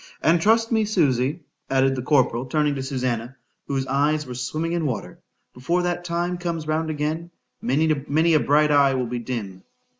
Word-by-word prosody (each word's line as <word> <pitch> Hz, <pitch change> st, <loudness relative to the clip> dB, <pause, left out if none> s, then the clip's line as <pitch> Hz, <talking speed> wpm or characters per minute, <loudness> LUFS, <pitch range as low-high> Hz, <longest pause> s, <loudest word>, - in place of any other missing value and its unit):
—And 165 Hz, +1 st, +4 dB
trust 225 Hz, +4 st, +3 dB
me, 220 Hz, -1 st, +3 dB
Susy, 150 Hz, -, +1 dB, 0.3 s
added 135 Hz, 0 st, +2 dB
the 130 Hz, -, -3 dB
corporal, 125 Hz, -2 st, +1 dB
turning 150 Hz, 0 st, +1 dB
to 135 Hz, -, -4 dB
Susannah, 130 Hz, -2 st, -3 dB, 0.3 s
whose 135 Hz, -1 st, -1 dB
eyes 150 Hz, +3 st, +1 dB
were 125 Hz, -, -7 dB
swimming 155 Hz, +7 st, -3 dB
in 170 Hz, -1 st, -1 dB
water,—before 125 Hz, +6 st, -4 dB
that 175 Hz, 0 st, -2 dB
time 175 Hz, +1 st, -2 dB
comes 170 Hz, -3 st, -3 dB
round 155 Hz, +1 st, -1 dB
again,—many 155 Hz, 0 st, -1 dB
a 155 Hz, -, +5 dB
bright 150 Hz, +1 st, +3 dB
eye 140 Hz, -2 st, +4 dB
will 130 Hz, -1 st, -1 dB
be 120 Hz, +1 st, -4 dB
dim. 110 Hz, -6 st, -5 dB
150 Hz, 160 wpm, -23 LUFS, 130-165 Hz, 0.3 s, a